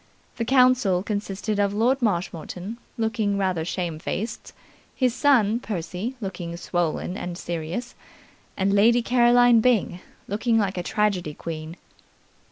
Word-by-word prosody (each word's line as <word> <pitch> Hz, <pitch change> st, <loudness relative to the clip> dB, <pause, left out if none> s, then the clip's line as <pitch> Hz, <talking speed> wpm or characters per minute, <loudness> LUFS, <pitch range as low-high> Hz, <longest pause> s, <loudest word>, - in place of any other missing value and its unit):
The 230 Hz, -, -1 dB
council 250 Hz, -7 st, +4 dB
consisted 205 Hz, 0 st, -3 dB
of 200 Hz, 0 st, +1 dB
Lord 250 Hz, +5 st, +2 dB
Marshmoreton, 185 Hz, +1 st, -3 dB, 0.2 s
looking 220 Hz, -3 st, 0 dB
rather 185 Hz, -4 st, 0 dB
shamefaced, 175 Hz, +5 st, -4 dB, 0.4 s
his 255 Hz, -3 st, +1 dB
son 240 Hz, -5 st, +3 dB
Percy 205 Hz, +3 st, -4 dB
looking 175 Hz, -5 st, -5 dB
swollen 175 Hz, +1 st, -2 dB
and 175 Hz, -4 st, -5 dB
serious, 175 Hz, +9 st, -4 dB, 0.6 s
and 195 Hz, +1 st, +1 dB
Lady 230 Hz, +4 st, +4 dB
Caroline 245 Hz, -1 st, +5 dB
Byng, 220 Hz, -7 st, +2 dB, 0.3 s
looking 225 Hz, +3 st, +1 dB
like 195 Hz, -4 st, 0 dB
a -, -, -1 dB
tragedy 180 Hz, -5 st, -1 dB
queen. 160 Hz, 0 st, -6 dB
205 Hz, 120 wpm, -24 LUFS, 180-235 Hz, 0.6 s, Caroline